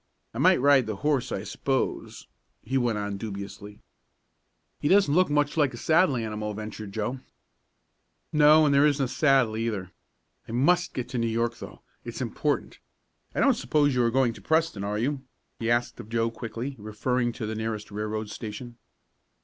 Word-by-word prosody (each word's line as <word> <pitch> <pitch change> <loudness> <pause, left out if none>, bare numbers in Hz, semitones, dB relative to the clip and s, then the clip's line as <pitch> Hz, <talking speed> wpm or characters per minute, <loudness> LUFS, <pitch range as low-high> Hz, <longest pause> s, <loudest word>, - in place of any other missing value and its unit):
"I - - -5
might - - +5
ride 140 -2 +4
the 110 - -3
horse, 145 -5 +1
I - - -3
suppose," - - -2 0.4
he 130 +4 -4
went 120 -4 +1
on 100 -1 -3
dubiously. 100 0 -7 1.0
"He - - -1
doesn't 190 -3 +4
look 180 +1 +4
much 145 +1 +1
like 145 -5 +2
a - - -8
saddle 160 +1 +3
animal," 105 -2 -3
ventured 110 -1 -7
Joe. 110 +5 -3 1.1
"No, 150 +1 +6
and 145 - +3
there 140 +2 +5
isn't 140 -2 +1
a - - -3
saddle, 135 -5 +3
either. 105 -5 -3 0.6
I - - -7
must 175 +9 +2
get 125 -2 -3
to 125 - -2
New 115 - +1
York 115 +1 -1
though - - -10 0.2
it's - - -7
important. - - -2 0.6
I - - +1
don't - - +5
suppose 145 -2 +1
you 125 - +2
are 115 - +3
going 125 -1 +2
to - - -13
Preston; 160 -10 +1
are 105 +1 -2
you?" 135 +5 -1 0.4
he 115 - -1
asked 120 +1 0
of 110 -2 -9
Joe 115 0 0
quickly, 115 +4 -6
referring 120 +4 -1
to 110 - -5
the 110 - -3
nearest 110 -1 -4
railroad 105 +1 -4
station. 120 +2 -7
120 Hz, 180 wpm, -26 LUFS, 110-140 Hz, 1.1 s, No